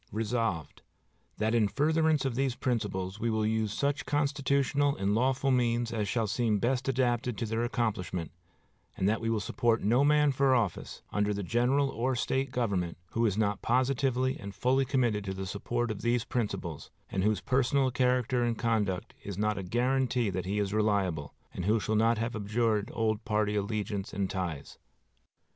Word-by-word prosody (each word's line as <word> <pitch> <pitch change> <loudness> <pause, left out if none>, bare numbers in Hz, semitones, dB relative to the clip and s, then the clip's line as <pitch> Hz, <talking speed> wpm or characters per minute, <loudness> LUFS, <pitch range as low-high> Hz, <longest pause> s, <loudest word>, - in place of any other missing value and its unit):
Resolved, 110 - -2 0.6
"That 110 +1 0
in 115 -3 +3
furtherance 155 +3 +2
of 135 - 0
these 130 0 0
principles 100 -6 -2
we 115 - 0
will 110 -1 +1
use 110 -1 0
such 140 +6 -1
constitutional 140 0 +1
and 100 +1 0
lawful 130 +4 +2
means 120 -2 +1
as 105 -3 -1
shall 115 0 0
seem 110 +1 +1
best 125 +4 0
adapted 125 -3 0
to 115 - -2
their 115 +1 -1
accomplishment, 105 -9 -2 0.7
and 95 - +1
that 110 +2 +1
we 115 - -1
will 115 -1 +1
support 115 +2 0
no 120 +7 +3
man 150 0 +4
for 135 0 +3
office, 110 -8 -2
under 105 0 0
the 100 - -3
general 125 +7 +2
or 130 +2 -1
State 135 +2 0
government, 100 -9 -1
who 115 0 +2
is 100 -1 -1
not 105 -2 0
positively 130 +1 +1
and 100 0 -8
fully 130 +2 +2
committed 120 -6 +1
to 95 -1 -3
the 95 0 -4
support 120 +5 -2
of 110 - -6
these 120 0 +1
principles, 100 - -3 0.2
and 95 - 0
whose 105 0 +2
personal 135 0 +1
character 125 0 +1
and 120 -1 0
conduct 105 -6 -1
is 100 -3 -6
not 105 -1 0
a - - -3
guarantee 125 +2 +1
that 90 0 -3
he 100 +2 -1
is 100 -1 -1
reliable, 100 -9 0 0.2
and 90 - -4
who 110 +3 +3
shall 110 +1 -1
not 115 +1 +3
have 115 +2 -2
abjured 105 0 0
old 110 -1 0
party 105 -2 0
allegiance 105 -1 -2
and 100 -1 -1
ties." 85 -7 -4
115 Hz, 180 wpm, -30 LUFS, 105-130 Hz, 0.7 s, man